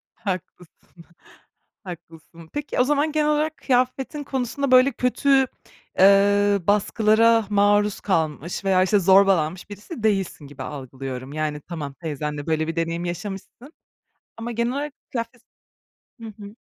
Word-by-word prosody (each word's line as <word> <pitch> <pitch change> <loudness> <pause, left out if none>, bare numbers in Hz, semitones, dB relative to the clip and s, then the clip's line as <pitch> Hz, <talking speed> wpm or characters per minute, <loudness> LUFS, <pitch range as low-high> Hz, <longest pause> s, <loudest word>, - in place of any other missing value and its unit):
Haklısın, 180 -3 -8 0.8
haklısın. 165 -2 -12
Peki 290 -3 -3
o - - +6
zaman 295 +3 +1
genel 300 0 +1
olarak 305 +1 0
kıyafetin 260 +3 -1
konusunda 270 +1 -2
böyle 255 +2 +6
kötü, 265 +2 +2 0.5
eee, 200 +1 +5
baskılara 220 +2 +3
maruz 205 0 +2
kalmış 165 0 -2
veya, 185 -1 +4
işte, 200 +2 +3
zorbalanmış 190 -2 +3
birisi 210 - -9
değilsin 195 -8 -1
gibi 140 -1 -9
algılıyorum. 130 -1 -7
Yani 150 -1 -3
tamam 150 -4 -6
teyzenle 150 -1 -5
böyle 160 0 0
bir 165 - -3
deneyim 165 +1 -2
yaşamışsın 195 - -7 0.6
ama 230 +1 -5
genel 235 +1 -1
olarak 285 +1 -3 0.2
kıyafet 230 0 -5
s - - -50 0.8
Hı - - -6 0.2
hı. 205 +3 -11
200 Hz, 130 wpm, -23 LUFS, 165-245 Hz, 0.8 s, o